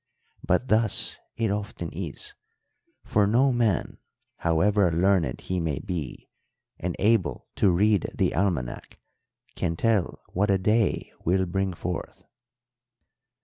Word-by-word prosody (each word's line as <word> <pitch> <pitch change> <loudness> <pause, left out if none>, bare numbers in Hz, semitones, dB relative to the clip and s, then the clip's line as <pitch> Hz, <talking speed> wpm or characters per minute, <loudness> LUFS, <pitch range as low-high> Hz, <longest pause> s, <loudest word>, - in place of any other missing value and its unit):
But 125 - +1
thus 110 -1 +3 0.2
it 115 -3 0
often 100 -5 -4
is; 85 -3 -6 0.7
for 105 -1 +2
no 130 +6 +4
man, 115 -7 0 0.4
however 95 +4 +2
learned 85 -6 +1
he 95 -1 -2
may 80 -5 -1
be 90 -9 -5 0.5
and 90 0 -3
able 100 - +1
to 100 - +4
read 100 +2 +2
the - - +1
almanac, 80 -10 -2 0.6
can 85 - -1
tell 110 -1 0
what 100 +3 +1
a 100 - +4
day 105 +3 +1
will 95 +2 +2
bring 95 +1 -1
forth." 90 0 -5
95 Hz, 120 wpm, -26 LUFS, 85-105 Hz, 0.7 s, no